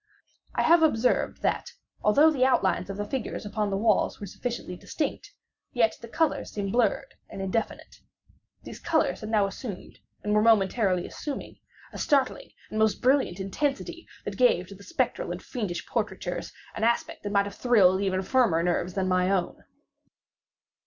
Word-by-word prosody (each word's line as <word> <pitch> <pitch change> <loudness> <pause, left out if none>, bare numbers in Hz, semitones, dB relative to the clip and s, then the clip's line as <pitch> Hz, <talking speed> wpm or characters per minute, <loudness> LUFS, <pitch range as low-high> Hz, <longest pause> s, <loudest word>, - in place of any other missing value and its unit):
I - - +2
have 335 +1 +6
observed 250 -6 +2
that, - - -1 0.3
although 290 +10 +5
the 265 -4 +1
outlines 195 -8 +2
of 195 - -5
the 205 - -2
figures 235 -1 -4
upon 210 0 -1
the 195 - -1
walls 215 -1 +2
were 205 - -6
sufficiently 230 -2 -5
distinct, 300 - -4 0.4
yet 230 -4 +2
the 235 - -8
colors 320 +6 0
seemed 200 -2 -3
blurred 245 +4 +1 0.2
and - - -8
indefinite. 195 +4 -3 0.7
These - - -9
colors 325 -2 +1
had 215 - -6
now 215 -2 +3
assumed, 195 0 -7 0.2
and 210 - 0
were 210 - +4
momentarily 200 -4 +3
assuming, 290 -2 -6 0.3
a - - -7
startling 275 -3 +1 0.2
and 215 - -2
most 220 -1 +3
intense 195 -8 +1 0.2
brilliancy, 340 0 -9 0.2
that - - -5
gave - - +4
to - - -9
the - - -16
spectral - - -1
and - - -6
fiendish 205 -9 -4
portraitures - - -3 0.2
an 220 - -4
aspect 235 +1 0
that 205 - -4
might 200 -1 +3
have 200 - -6
thrilled 195 -6 +4
even 190 -1 0
firmer 200 -8 +2
nerves 175 0 -1
than 190 -1 0
my 185 0 +2
own. 190 -3 -1
210 Hz, 165 wpm, -27 LUFS, 195-255 Hz, 0.7 s, have